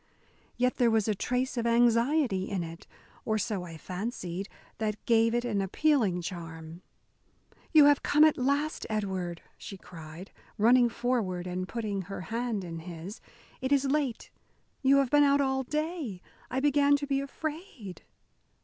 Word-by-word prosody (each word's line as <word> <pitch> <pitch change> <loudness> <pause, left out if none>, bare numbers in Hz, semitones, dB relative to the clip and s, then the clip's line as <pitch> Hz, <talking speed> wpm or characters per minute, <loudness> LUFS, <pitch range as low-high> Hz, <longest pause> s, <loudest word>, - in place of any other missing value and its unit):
Yet 250 +1 +1
there 240 -2 +4
was 225 -2 +2
a 215 - +2
trace 250 +5 -2
of 235 0 0
anxiety 235 -2 +2
in 190 -4 -2
it, 165 0 -9 0.4
or 220 -1 0
so 205 -2 -2
I 170 -2 -8
fancied, 185 0 -5 0.3
that 215 -1 -3
gave 230 0 +3
it 240 0 0
an 210 -5 0
appealing 200 - +1
charm. 165 -1 -7 0.9
"You 305 -2 +8
have 290 -1 +5
come 300 +1 +4
at 310 -1 +6
last, 285 +4 -1
Edward," 190 -5 -3 0.2
she 195 - -8
cried, 170 0 -11 0.3
running 240 +3 +5
forward 230 -7 -1
and 185 0 -3
putting 210 -4 -3
her 195 0 -7
hand 230 0 -3
in 165 -2 -6
his. 175 +4 -8 0.4
"It 260 +1 -2
is 280 -1 +3
late. 275 -4 -1 0.5
You 275 +1 +5
have 275 -3 +2
been 290 0 +6
out 280 0 +4
all 265 -1 +1
day; 300 - -3 0.3
I 260 - -1
began 285 0 +4
to 285 0 -2
be 275 -1 0
afraid." 280 - -7
230 Hz, 160 wpm, -29 LUFS, 185-275 Hz, 0.9 s, You